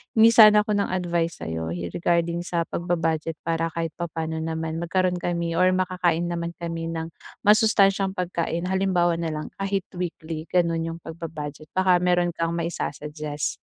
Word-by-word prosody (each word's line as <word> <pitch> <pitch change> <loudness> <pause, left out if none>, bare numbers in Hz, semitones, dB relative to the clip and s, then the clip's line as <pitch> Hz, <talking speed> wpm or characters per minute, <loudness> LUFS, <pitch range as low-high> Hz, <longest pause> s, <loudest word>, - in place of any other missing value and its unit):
hingi 225 +1 +7
sana 215 -2 +9
ako 210 - +1
ng - - -4
advice 170 -2 -1
sa'yo 80 0 -3 0.2
regarding 170 0 +1
sa 170 -2 0
pagba-budget 165 -2 -1
para 165 0 -1
kahit 165 -1 -3
papano 160 -2 -4
naman 160 0 -3
magkaroon 180 +1 +1
kami 170 -1 -2
or 185 +2 +4
makakain 180 -2 +1
naman 170 0 -3
kami 165 -1 -4
ng 165 0 -3 0.3
masustansyang 205 -3 +4
pagkain. 175 -1 -2
Halimbawa 185 -3 +2
na 165 -1 -2
lang 155 0 -4
kahit 195 -1 -2
weekly, 165 -3 -4
gano'n, 170 -2 +2
'yong 165 - -8
pagba-budget 155 -2 -7
baka 185 -1 +4
mayro'n 175 -1 +2
kang 165 0 -1
mai-sa-suggest. 150 -3 -3
170 Hz, 150 wpm, -24 LUFS, 165-180 Hz, 0.3 s, sana